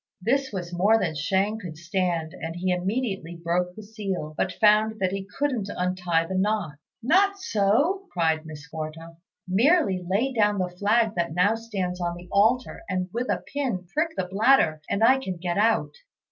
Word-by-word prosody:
This 265 +7 0
was 180 -3 -5
more 200 +6 +4
than 170 -7 -1
Shang 195 +7 0
could 175 -7 -8
stand, 170 -2 -1
and 165 0 -6
he 180 +1 -1
immediately 195 -2 -2
broke 175 +1 -1
the 215 - -9
seal, 200 -7 -5
but 185 - 0
found 215 +1 +3
that 185 -1 +1
he 195 0 -4
couldn't 255 -8 -1
untie 180 -3 0
the 190 - -5
knot. 190 -6 -1 0.2
"Not 390 +9 +3
so," 325 - +1
cried 160 -2 +1
Miss 155 0 -10
Quarta; 160 +1 -7 0.3
"merely 210 - +3
lay 205 +9 0
down 210 -3 +2
the 185 -1 -1
flag 210 +5 +1
that 170 -2 -1
now 190 +5 +4
stands 195 -6 -4
on 175 0 -1
the 175 +1 -11
altar, 225 +6 +2
and 185 -1 -1
with 245 +2 -2
a - - -1
pin 250 -11 -2
prick 320 +1 0
the 185 - 0
bladder, 190 - +3
and 200 +2 0
I 260 +3 +6
can 190 -9 -5
get 175 +2 -2
out." 210 -9 +2
190 Hz, 180 wpm, -25 LUFS, 175-225 Hz, 0.3 s, I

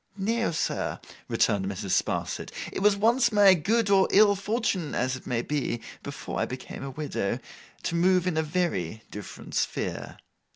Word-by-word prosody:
'No, 225 +4 0
sir,' 155 - -2 0.3
returned 95 -2 +1
Mrs. 100 0 -4
Sparsit. - - -1 0.2
'It - - -2
was 205 0 +4
once 235 +3 +3
my 205 -2 +7
good 200 +5 +1
or 195 -1 +5
ill 205 0 +6
fortune, 200 -5 -1
as 130 +1 0
it 130 - -10
may 120 -1 0
be—before 140 -5 -4
I - - +2
became 125 0 -7
a 140 - -4
widow—to 130 -6 -2 0.6
move 180 +1 +3
in 180 -3 0
a 160 - +2
very 150 - -1
different 105 -2 -9
sphere. - - -2
175 Hz, 155 wpm, -27 LUFS, 125-205 Hz, 0.6 s, my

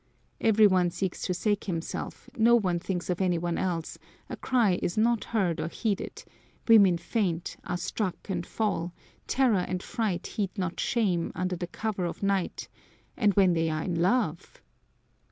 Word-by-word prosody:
Every 220 -1 +5
one 185 -3 +4
seeks 185 +1 -3
to 180 - 0
save 205 +2 0
himself, 165 -4 -5
no 235 +1 +5
one 185 -7 +1
thinks 180 0 -3
of 180 - -2
any 180 -2 +2
one 170 0 -2
else; 170 -4 -2 0.3
a - - -2
cry 230 -8 +2
is 175 - -2
not 230 +1 +2
heard 185 -7 0
or - - -2
heeded, 205 +3 -3 0.4
women 200 -6 +7
faint, 170 -2 -2
are 180 - -2
struck 185 +1 -3
and 180 -4 -2
fall, 180 -4 -2 0.3
terror 250 -7 +3
and 180 0 -3
fright 205 -7 -2
heed 200 -1 -3
not 180 -2 -2
shame, 190 -8 +1
under 185 0 -1
the 175 0 -4
cover 200 -1 -3
of 170 - -5
night 195 -2 -1 0.5
and 210 -5 +2
when 190 -3 +5
they 165 -1 +1
are 155 0 -2
in 180 - -2
love! 180 -4 0
185 Hz, 170 wpm, -28 LUFS, 175-215 Hz, 0.5 s, women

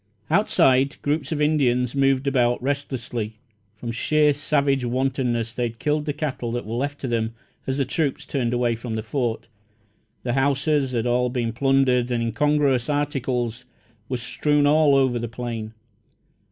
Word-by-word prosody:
Outside, 135 -9 +3
groups 145 0 -1
of 155 - -1
Indians 125 -5 +2
moved 135 -1 +2
about 125 -3 +2
restlessly. 125 -6 -3 0.4
From 120 +2 -5
sheer 150 +5 +2
savage 140 -2 +1
wantonness 125 -2 -1
they 125 - -4
had 115 0 -9
killed 150 +3 0
the 150 - 0
cattle 140 -5 -3
that 120 -2 -3
were 110 - -5
left 140 +4 -2
to 135 - -3
them, 115 -1 -1 0.3
as 130 0 -1
the 140 - +1
troops 150 +1 -1
turned 125 -5 -1
away 120 -1 +1
from 115 0 -5
the 110 - -3
Fort. 120 -1 -2 0.8
The 120 - -1
houses 140 0 +1
had 115 -1 0
all 125 +1 +2
been 120 -2 -2
plundered, 130 -1 +2
and 120 -1 0
incongruous 135 +1 +1
articles 125 -5 -1 0.4
were 130 - -1
strewn 145 +4 +1
all 150 -1 +5
over 130 -3 +2
the 120 - -3
plain. 115 -2 -5
130 Hz, 160 wpm, -23 LUFS, 120-145 Hz, 0.8 s, all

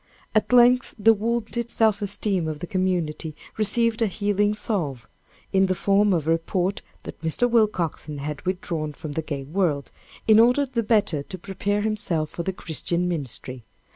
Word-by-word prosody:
At 215 - +1
length 250 +1 +5
the 225 +1 +6
wounded 235 +2 -2
self 220 -3 +2
esteem 200 -3 -1
of 155 -1 -3
the 160 - -6
community 175 -4 -1 0.2
received 225 +2 +1
a 225 - +4
healing 205 +2 0
salve, 155 - -3 0.5
in 190 0 +4
the 185 - 0
form 200 +2 +3
of 160 -4 0
a - - +3
report 180 +3 0 0.2
that - - -9
Mr. 160 +9 +1
Willcoxen 185 -10 0
had 150 +1 -5
withdrawn 170 -4 -3
from 150 +1 -7
the 160 - -2
gay 145 -3 -5
world, 150 -2 -1 0.4
in 220 0 +7
order 245 +5 +5
the 250 -3 -2
better 210 -9 +2
to 185 +6 -7
prepare 200 +3 -2
himself 175 -8 -1
for - - -4
the 190 - -2
Christian 170 0 -1
ministry. 130 -6 -5
190 Hz, 170 wpm, -24 LUFS, 160-215 Hz, 0.5 s, in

